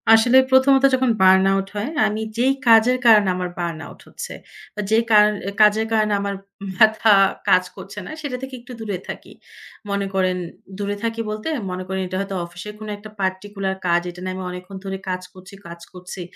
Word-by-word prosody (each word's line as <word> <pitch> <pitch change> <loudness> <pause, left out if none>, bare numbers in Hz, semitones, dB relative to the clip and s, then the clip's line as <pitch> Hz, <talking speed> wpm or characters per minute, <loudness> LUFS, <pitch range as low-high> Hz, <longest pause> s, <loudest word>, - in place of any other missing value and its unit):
আসলে 225 +3 +6
প্রথমত 265 +1 +5
যখন 260 -1 +1
বার্ন 190 0 +6
আউট 195 0 -1
হয়, 210 +6 -2 0.2
আমি 215 +1 -3 0.2
যেই 260 +3 +3
কাজের 230 +2 +6
কারণে 210 -4 +6
আমার 180 0 -3
বার্ন 170 -2 -3
আউট - - -14
হচ্ছে। - - -8 0.6
যে, 220 - +4
কার 210 -1 +7 0.3
কাজের 215 +1 +5
কারণে 215 -1 +2
আমার 200 0 -3 0.4
মাথা 220 +1 +5 0.4
কাজ 185 - +5
করছে 200 +1 -9
না - - -9
সেটা 280 -4 -4
থেকে 265 0 -7
একটু 250 +1 -11
দূরে 205 -4 -3
থাকি। - - -8 0.6
মনে 200 0 -1
করেন 185 -1 +1 0.4
দূরে 205 0 -3
থাকি 230 0 -2
বলতে, 215 +4 -5 0.2
মনে 180 0 -4
করেন 190 0 -3
এটা 185 +1 -4
হয়তো 195 0 -5
অফিসের 180 +4 -9
কোন 215 - -8
একটা 210 +1 -12
পার্টিকুলার 190 +1 -2
কাজ। 175 0 +3
এটা 175 +1 -10
না - - -2
আমি 190 - -5
অনেকক্ষণ 180 +2 -8
ধরে 195 0 -4
কাজ 185 0 -2
করছি 185 +1 -14
কাজ 170 0 -10
করছি 180 +1 -9
200 Hz, 185 wpm, -21 LUFS, 185-220 Hz, 0.6 s, কার